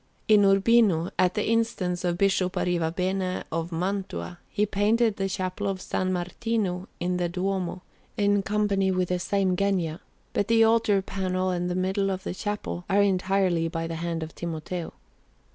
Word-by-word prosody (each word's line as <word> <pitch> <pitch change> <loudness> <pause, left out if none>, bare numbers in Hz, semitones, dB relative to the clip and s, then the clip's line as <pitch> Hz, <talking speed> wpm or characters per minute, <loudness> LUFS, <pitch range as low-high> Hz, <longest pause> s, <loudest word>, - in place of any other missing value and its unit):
In 210 -2 +6
Urbino, 195 -3 +4
at 180 0 +3
the 210 - 0
instance 215 -6 0
of 175 -1 0
Bishop 190 -1 +2
Arrivabene 180 +2 -1
of 165 +1 -2
Mantua, 185 0 -3
he 210 - +1
painted 215 +2 +2
the 195 0 -1
Chapel 185 +1 -3
of 195 -1 -1
S. 185 - -13
Martino 185 +1 -2
in 180 +1 0
the 175 -1 0
Duomo, 185 0 -2 0.3
in 205 -1 +3
company 200 -1 +1
with 185 -1 0
the 180 0 0
same 190 0 +1
Genga; 180 -4 0 0.3
but 205 - 0
the 230 0 +5
altar 225 -3 +3
panel 185 -1 -1
and 180 0 -1
the 180 - -1
middle 190 +2 0
of 190 -1 -3
the - - -3
chapel 205 -2 -4
are 200 +1 +4
entirely 185 -3 +1
by 165 0 -3
the 165 0 -4
hand 170 -1 -2
of 160 - -8
Timoteo. 170 +1 -5
185 Hz, 165 wpm, -26 LUFS, 180-200 Hz, 0.3 s, In